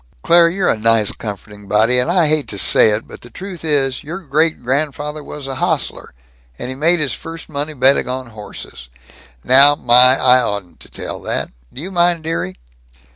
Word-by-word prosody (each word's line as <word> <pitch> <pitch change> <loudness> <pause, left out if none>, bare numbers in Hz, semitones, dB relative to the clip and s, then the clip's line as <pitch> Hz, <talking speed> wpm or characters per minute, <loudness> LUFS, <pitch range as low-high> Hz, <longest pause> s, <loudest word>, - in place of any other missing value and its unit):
Claire, 170 0 +5
you're 185 +2 -2
a - - +2
nice 115 -1 +2
comforting 105 -1 -9
body, 110 +5 +2
and 125 - -1
I 175 -1 +2
hate 155 -1 0
to 100 - -5
say 100 - +4
it, 105 +1 -2
but - - -12
the 120 - -14
truth 185 0 -9
is, 135 -5 0
your 170 +6 -7
great 155 -2 0
grandfather 145 +3 -3
was 145 -1 -8
an 135 -1 -5
hostler, 60 - -3 0.4
and 130 +2 -7
made 170 +3 +3
his 145 -5 0
first 165 +3 -9
money 150 +1 -4
betting 135 -1 +3
on 130 0 -4
horses. 105 - -10 0.5
Now, 140 +3 +6
my, 125 0 +5
I 125 0 +4
oughtn't 100 -6 -5
to - - -13
tell - - -7
that. - - -2 0.2
Do - - -9
you 190 - -7
mind, 175 -2 +1
dearie?" 95 - -4
135 Hz, 185 wpm, -17 LUFS, 120-160 Hz, 0.5 s, Now